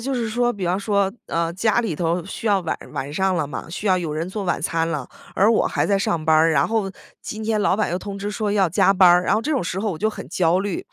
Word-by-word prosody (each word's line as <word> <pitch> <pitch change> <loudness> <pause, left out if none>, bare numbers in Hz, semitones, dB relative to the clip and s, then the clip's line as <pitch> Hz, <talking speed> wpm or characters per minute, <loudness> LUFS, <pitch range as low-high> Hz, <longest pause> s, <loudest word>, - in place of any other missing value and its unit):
就 275 - -1
是 235 -3 -1
说， 240 +2 +1
比 200 -5 -5
方 180 +3 +1
说， 200 -1 0
呃， 165 0 -1
家 215 +5 +1
里 220 -8 -2
头 170 +1 -1
需 195 +4 -7
要 200 -2 +3
晚 170 - -3 0.2
晚 140 +2 -4
上 190 +4 +1
了 155 -3 0
嘛， 145 - -7
需 190 +5 -5
要 185 -2 +4
有 170 -4 -3
人 160 +4 -3
做 205 +2 -4
晚 175 - -1
餐 165 0 -1
了， 150 -6 -4 0.3
而 205 +4 +4
我 230 - +3
还 - - 0
在 200 -1 +2
上 170 -4 -1
班 160 0 +4
儿。 160 +1 +5
然 140 -3 +3
后 220 -4 -1 0.3
今 215 - -6
天 215 -1 0
老 200 - +2
板 215 - 0
又 175 - -1
通 200 0 -7
知 205 +1 -4
说 210 0 -2
要 195 -3 +3
加 190 +3 +3
班 185 -2 +6
儿， 175 +1 +5
然 - - +2
后 215 - +1
这 300 - -3
种 270 - 0
时 180 +2 -3
候 215 0 -1
我 160 - -7
就 215 - +1
很 - - -9
焦 175 0 +2
虑， 195 -1 -3
190 Hz, 315 characters per minute, -22 LUFS, 170-210 Hz, 0.3 s, 班